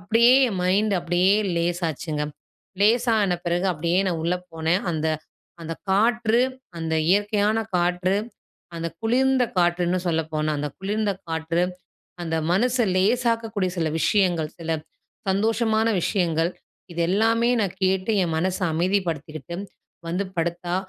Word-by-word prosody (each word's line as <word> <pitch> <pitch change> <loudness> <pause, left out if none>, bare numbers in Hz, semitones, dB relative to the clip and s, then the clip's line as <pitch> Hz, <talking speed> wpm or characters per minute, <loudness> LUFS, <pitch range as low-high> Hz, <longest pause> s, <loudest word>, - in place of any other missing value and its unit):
அப்பிடியே 230 +6 +4 0.2
என் 195 - -4
மைண்ட்டு 200 +2 +2
அப்பிடியே 180 +4 +3 0.2
லேசாச்சுங்க. 170 -3 -1 0.6
லேசான 220 -3 +3
பிறகு 175 +2 0
அப்பிடியே 170 +2 0
நான் 170 -3 -1
உள்ள 170 +2 +1 0.2
போனேன். 165 +4 0
அந்த 160 0 -1 0.6
அந்த 165 - -4 0.2
காற்று 230 +3 +3 0.4
அந்த 160 -1 -2 0.2
இயற்கையான 205 +2 +2 0.2
காற்று, 180 +2 +1 0.6
அந்த 165 0 -3
குளிர்ந்த 255 +3 +2
காற்றுன்னு 175 +1 +2
சொல்லப்போனா, 160 -2 -1
அந்த 150 0 -2
குளிர்ந்த 205 +1 -1 0.2
காற்று 165 +1 -1 0.6
அந்த 165 -1 -2 0.2
மனச 245 +6 +2 0.2
லேசாக்கக்கூடிய 225 -2 +1
சில 165 -2 +1
விஷயங்கள், 175 -7 +2
சில 165 -1 -5 0.6
சந்தோஷமான 220 +3 +1
விஷயங்கள், 170 -3 +1 0.4
இது 170 - -4
எல்லாமே 225 +4 +2
நான் 190 -3 -2
கேட்டு 190 +3 +1
என் 165 -3 -1
மனச 185 +2 0
அமைதிப்படுத்திக்கிட்டு, 170 -2 -2 0.5
வந்து 185 +4 -1
படுத்தா, 175 +1 -1
185 Hz, 120 wpm, -24 LUFS, 170-215 Hz, 0.6 s, அப்பிடியே